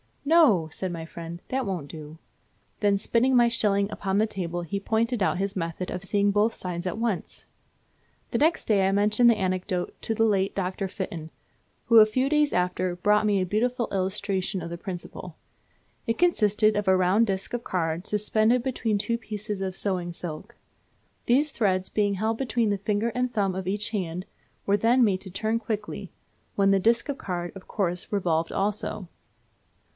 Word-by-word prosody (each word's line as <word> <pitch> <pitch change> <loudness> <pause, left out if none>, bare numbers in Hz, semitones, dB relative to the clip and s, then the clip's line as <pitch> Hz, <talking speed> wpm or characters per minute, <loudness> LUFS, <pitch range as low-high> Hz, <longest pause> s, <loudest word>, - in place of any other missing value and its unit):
'No,' 275 - +5
said 185 +4 -3
my 165 -1 -5
friend, 170 +1 -8
'that 265 0 -1
won't 175 -8 -4
do;' 155 +1 -9 0.6
then 205 -1 +3
spinning 245 +6 +2
my 240 -1 +6
shilling 205 -3 +1
upon 195 -1 -2
the 215 - +4
table, 175 -5 -4
he 175 +4 -3
pointed 225 +3 0
out 185 - +2
his 195 +1 -2
method 170 +1 -3
of 180 - -5
seeing 200 +1 +2
both 210 +3 +2
sides 180 0 -3
at 180 - -3
once. 225 -5 -3 0.9
The - - 0
next 320 +3 +2
day 195 -3 +3
I - - +2
mentioned 210 +4 +4
the 230 - +4
anecdote 185 -2 -2
to 225 - -1
the 225 - +2
late 200 -3 +1
Dr. 190 0 -2
Fitton, 170 -4 -6 0.6
who 230 - +5
a 215 - +9
few 255 +5 0
days 300 -1 +2
after 180 0 0
brought 210 +4 +2
me 200 -2 +2
a - - 0
beautiful 235 +6 0
illustration 190 -1 -1
of - - -6
the 170 - -4
principle. 175 -1 -7 0.7
It 230 - 0
consisted 215 - +3
of 205 -1 -1
a 190 - +5
round 190 +5 +3
disc 195 +2 -3
of 240 -1 -2
card 165 0 -2
suspended 215 +3 +2
between 235 -5 -1
two 230 +3 0
pieces 210 -2 -5
of 190 -1 -3
sewing 180 -4 -2
silk. 175 +7 -7 0.7
These 280 +5 +3
threads 190 -6 0
being 205 -2 +1
held 220 +3 -1
between 235 -3 0
the 200 -1 0
finger 210 +3 0
and 250 0 -1
thumb 200 -4 0
of 185 0 -5
each 205 +3 -1
hand, 180 -3 -3 0.4
were 200 +1 +3
then 235 +4 +4
made 195 -4 +2
to 190 - -9
turn 220 +4 -1
quickly, 215 -2 -4 0.5
when 195 -1 +3
the 195 - +4
disc 230 +7 +2
of 280 - -2
card, 175 -1 -4
of 195 -1 -12
course, 180 -4 -2
revolved 170 -5 0
also. 205 -1 -2
200 Hz, 185 wpm, -26 LUFS, 185-225 Hz, 0.9 s, a